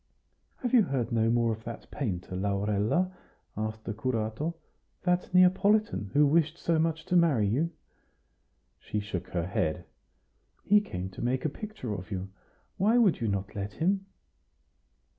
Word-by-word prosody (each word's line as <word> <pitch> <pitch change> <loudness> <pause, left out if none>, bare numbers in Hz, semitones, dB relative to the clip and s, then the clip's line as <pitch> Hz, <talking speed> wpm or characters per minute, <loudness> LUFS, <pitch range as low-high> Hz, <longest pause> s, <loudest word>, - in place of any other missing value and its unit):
"Have 245 - -1
you 245 - +8
heard 135 - -1
no 115 -1 +2
more 115 0 +2
of 110 +1 -9
that 115 0 -8
painter, 95 -9 -3
Laurella?" 105 - +1 0.4
asked 110 +1 -4
the 110 - -3
curato 120 +7 -2 0.5
"that 180 0 +1
Neapolitan, 185 - +3
who 145 +1 +5
wished 160 +2 +2
so 165 -2 +1
much 160 0 0
to 180 - 0
marry 155 -11 +4
you?" 140 +11 +1 1.1
She 105 - -3
shook 100 -4 -4
her 85 -2 -2
head. 90 -3 -1 0.8
"He 210 +1 +5
came 95 - -5
to - - -8
make 125 +3 0
a - - +2
picture 175 - -6
of 95 -1 -6
you. 95 -1 -4 0.5
Why 215 +5 +4
would 205 - +4
you 115 - 0
not 100 0 -2
let 100 0 -4
him?" 195 +4 0
120 Hz, 155 wpm, -29 LUFS, 105-175 Hz, 1.1 s, you